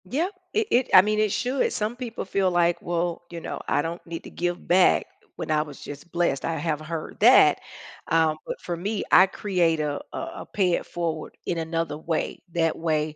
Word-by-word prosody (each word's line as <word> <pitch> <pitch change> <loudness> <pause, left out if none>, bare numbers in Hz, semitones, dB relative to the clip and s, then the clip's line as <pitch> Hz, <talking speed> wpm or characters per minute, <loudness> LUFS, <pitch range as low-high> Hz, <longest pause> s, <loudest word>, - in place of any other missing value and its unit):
Yep. 310 - -1 0.2
It 435 0 +1
it 250 +1 +3
I 185 - +11
mean, 215 +2 0
it 215 -1 +2
should, 250 +5 0
some 215 +3 -2
people 245 -2 -5
feel 190 -1 +1
like, 175 -1 +2
"Well, 170 0 -2
you 170 - -6
know, - - -5
I - - +2
don't 170 +1 -5
need 165 -1 -6
to - - -10
give 175 0 -3
back, 180 +1 +4 0.3
when - - -4
I 150 -1 +3
was 150 -2 -8
just 145 +4 -9
blessed," 170 -6 0
I 165 - -1
have 155 -1 -2
heard 155 0 -6
that, - - +7 0.5
um, 160 -1 +2
but - - -4
for 175 - -4
me, 200 +4 -2
I 185 +1 +8
create 180 -5 0
a 150 -1 -1
a - - -6 0.2
a - - -8
pay-it-forward, 170 -4 -1
in 170 - -1
another 165 -1 -2
way. 160 0 -2
That 165 -1 +1
way, 155 -2 -1
170 Hz, 200 wpm, -25 LUFS, 160-190 Hz, 0.5 s, I